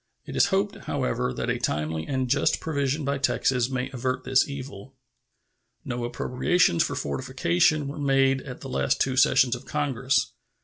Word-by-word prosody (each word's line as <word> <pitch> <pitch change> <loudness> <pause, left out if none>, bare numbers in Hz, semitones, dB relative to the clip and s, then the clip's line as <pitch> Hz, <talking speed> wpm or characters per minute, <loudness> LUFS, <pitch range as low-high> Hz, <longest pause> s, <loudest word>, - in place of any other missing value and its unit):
It - - -7
is - - +4
hoped, 200 +1 0
however, 125 -3 -1
that - - -2
a - - -2
timely 80 +2 -2
and 130 -2 -1
just 140 +4 +2
provision 145 -1 -1
by 140 0 -1
Texas 130 -2 +1
may 130 -1 -3
avert 130 0 -2
this 130 0 +3
evil. 135 -3 -8 0.9
No 120 -1 -3
appropriations 125 - +1
for - - 0
fortifications 85 - +1
were 140 +2 -6
made 135 -1 +2
at 125 -3 -9
the - - -7
two 70 - 0
last - - -5
sessions 125 0 +4
of 125 - -11
Congress. 135 -2 0
130 Hz, 165 wpm, -26 LUFS, 125-140 Hz, 0.9 s, is